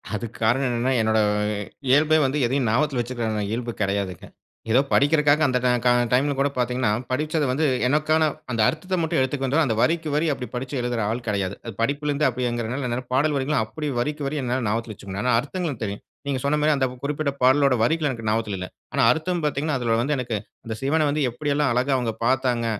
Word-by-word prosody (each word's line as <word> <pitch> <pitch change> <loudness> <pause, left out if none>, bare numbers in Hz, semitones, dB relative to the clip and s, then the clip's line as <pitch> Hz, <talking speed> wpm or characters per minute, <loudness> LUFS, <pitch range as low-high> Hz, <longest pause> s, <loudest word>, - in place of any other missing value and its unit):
அதுக்கு 115 +1 -6
காரணம் 125 +5 +2
என்னனனா 120 +2 0
என்னோட 110 0 +2 0.7
இயல்பே 150 +4 +5
வந்து 135 +3 0
எதையும் 130 +1 0
ஞாபகத்துல 130 +3 +1
வச்சிருக்கிற 115 -3 -2
இயல்பு 120 +1 -2
கெடையாதுங்க. 100 -2 -2 0.4
ஏதோ 125 - +5
படிக்கிறதுக்காக 150 +1 +4
அந்த 130 -1 +1
கா 125 - +3 0.2
கா 125 - +6 0.2
டைம்ல 140 +3 +3
கூட 140 +1 +2
பாத்தீங்கன்னா, 125 -1 0 0.2
படிச்சது 150 +3 0
வந்து 150 +5 +1 0.2
எனக்கான 155 +3 +2 0.3
அந்த 115 -2 0
அர்த்தத்த 185 +4 -3
மட்டும் 160 -4 0
எடுத்துக்கொண்டு 135 +1 0
அந்த 115 -5 0
வரிக்கு 165 -1 +1
வரி 150 +2 +2
அப்படி 125 -2 -6
படிச்சு 130 +3 -4
எழுதுற 120 -1 -1
ஆள் 120 +2 -3
கெடையாது. 100 -2 -1 0.3
படிப்பிலருந்து 145 +4 +1
அப்டிங்கிறதுனால 125 +1 -2
என்ன 125 +2 -3
பாடல் 145 +3 +2
வரிகள்லாம் 135 -4 0
அப்படி 150 +6 -4
வரிக்கு 150 +3 -2
வரி 150 +2 -2
என்னால 125 -1 -1
ஞாபகத்துல 115 +1 -2
வச்சுக்கணும். 100 0 -6
ஆனா 125 -1 +2
அர்த்தங்களும் 145 - -4
தெரியும். 100 -1 -4 0.2
நீங்க 135 -2 -1
சொன்ன 145 +2 +2
மாரி 155 +1 +3
அந்த 135 - +2 0.2
குறிப்பிட்ட 145 0 -1
பாடளோட 135 +2 +5
வரிகள் 155 +4 +1
எனக்கு 115 -4 -5
ஞாபகத்ல 105 -2 -1
இல்ல. 90 - -4 0.3
ஆனா - - +1
அர்த்தம் 170 +1 -1
பார்த்தீங்கன்னா 150 0 0
அதுல 115 -2 +1
வந்து 145 +4 0
எனக்கு 120 -3 -3 0.3
அந்த 115 - -4
சிவன 155 +3 +2
வந்து 150 +1 0
எப்டியெல்லாம் 145 +2 0
அழகா 130 +3 +1
அவங்க 120 -3 -1
பாத்தாங்க 125 -2 +1
130 Hz, 185 wpm, -23 LUFS, 120-150 Hz, 0.7 s, கா